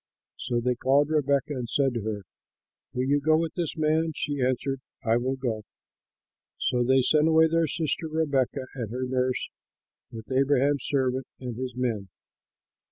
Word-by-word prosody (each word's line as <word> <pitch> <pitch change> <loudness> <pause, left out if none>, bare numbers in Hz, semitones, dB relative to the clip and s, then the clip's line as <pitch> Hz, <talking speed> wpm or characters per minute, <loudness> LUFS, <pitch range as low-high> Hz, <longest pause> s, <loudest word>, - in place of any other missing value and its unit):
So 120 -1 -1
they 125 +1 +1
called 140 +5 +2
Rebekah 140 -1 +1
and 125 -4 -4
said 135 -3 +2
to 115 - -2
her, 105 -1 -3 0.7
"Will 125 - -1
you 140 +2 +2
go 155 +2 +4
with 165 -1 -1
this 170 -4 -3
man?" 160 +1 +1
She 145 -3 -2
answered, 130 +1 0 0.2
"I 115 +1 +4
will 130 +2 -1
go." 120 -5 -2 1.0
So 125 -1 +1
they 130 +1 +4
sent 150 +4 +4
away 160 0 +6
their 165 0 +2
sister 160 +1 -2
Rebekah 140 -4 0
and 120 -5 -4
her 125 +3 -3
nurse 130 0 -1 0.6
with 110 +2 -9
Abraham's 140 +1 +2
servant 130 -2 0
and 125 -3 -5
his 125 0 -5
men. 115 -6 -2
130 Hz, 165 wpm, -27 LUFS, 125-150 Hz, 1.0 s, away